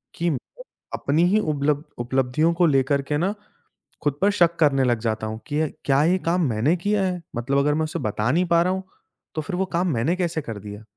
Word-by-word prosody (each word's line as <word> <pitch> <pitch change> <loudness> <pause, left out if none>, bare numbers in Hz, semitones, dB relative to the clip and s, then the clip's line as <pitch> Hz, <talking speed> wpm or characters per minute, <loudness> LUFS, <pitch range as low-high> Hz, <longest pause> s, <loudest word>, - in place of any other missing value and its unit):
कि 170 +1 0 0.6
अपनी 155 +5 +1
ही 215 - +5
उपलब्ध 150 -3 0 0.2
उपलब्धियों 130 +6 +1
को 175 +1 +3
लेकर 140 0 +2
के 145 +2 -2
ना, 190 +6 0 0.7
खुद 145 -1 0
पर 200 +1 +4
शक 170 -4 +3
करने 140 -4 +4
लग 120 -2 +1
जाता 110 -1 -2
हूँ 110 +1 -5
कि 150 +1 -1
अ, 155 - +1 0.2
क्या 140 +1 +3
ये 180 +3 +3
काम 175 +2 +2
मैंने 120 +10 +2
किया 200 +2 0
है? 180 -2 -2
मतलब 130 +4 0
अगर 145 +1 +2
मैं 160 - +1
उसे 155 - -4
बता 110 -1 -1
नहीं 175 +4 +2
पा 170 0 +4
रहा 185 +1 +1
हूँ, 190 - -3 0.5
तो 155 - -1
फिर 165 - -4
वो 190 - +1
काम 180 +1 +1
मैंने 130 +10 +1
कैसे 170 -3 -1
कर 115 -6 -6
दिया? 105 +1 -9
150 Hz, 225 wpm, -23 LUFS, 130-175 Hz, 0.7 s, ही